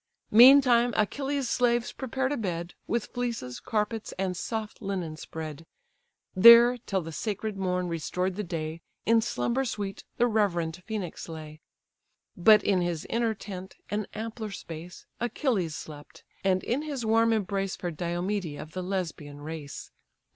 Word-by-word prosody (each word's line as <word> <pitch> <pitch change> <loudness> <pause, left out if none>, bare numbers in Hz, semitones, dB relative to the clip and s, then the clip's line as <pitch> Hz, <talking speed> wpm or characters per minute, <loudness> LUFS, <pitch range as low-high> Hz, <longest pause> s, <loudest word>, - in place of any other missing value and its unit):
Meantime 245 0 +7
Achilles' 275 +5 0
slaves 240 0 +1
prepared 265 +1 -2
a 290 - 0
bed, 175 -5 -3
With 235 -1 -1
fleeces, 230 - -3
carpets, 215 0 -2
and 190 -1 -1
soft 220 +4 -4
linen 185 -6 -3
spread: 160 0 -7 0.7
There, 235 +5 +9
till 195 -5 -2
the 165 0 -7
sacred 210 +5 -3
morn 180 -2 -1
restored 180 +3 -2
the 210 - -3
day, 165 -2 -4 0.2
In 230 0 +5
slumber 235 +3 0
sweet 205 -6 -4
the 240 - +4
reverend 180 -7 0
Phœnix 200 -6 -4
lay. 155 -1 -9 0.7
But 210 +3 +6
in 190 -3 +2
his 175 -3 -2
inner 230 -1 +1
tent, 190 -2 -8 0.2
an 210 0 -1
ampler 220 0 -5
space, 170 -2 -9
Achilles 230 - 0
slept; 145 -1 -10 0.2
and 185 -1 +2
in 250 +5 0
his 285 -6 -4
warm 225 +1 +4
embrace 195 -3 -1
Fair 175 - -4
Diomede 175 0 -2
of 155 - -8
the 185 - -4
Lesbian 165 -6 -4
race. 150 -1 -7
195 Hz, 145 wpm, -28 LUFS, 170-230 Hz, 0.7 s, There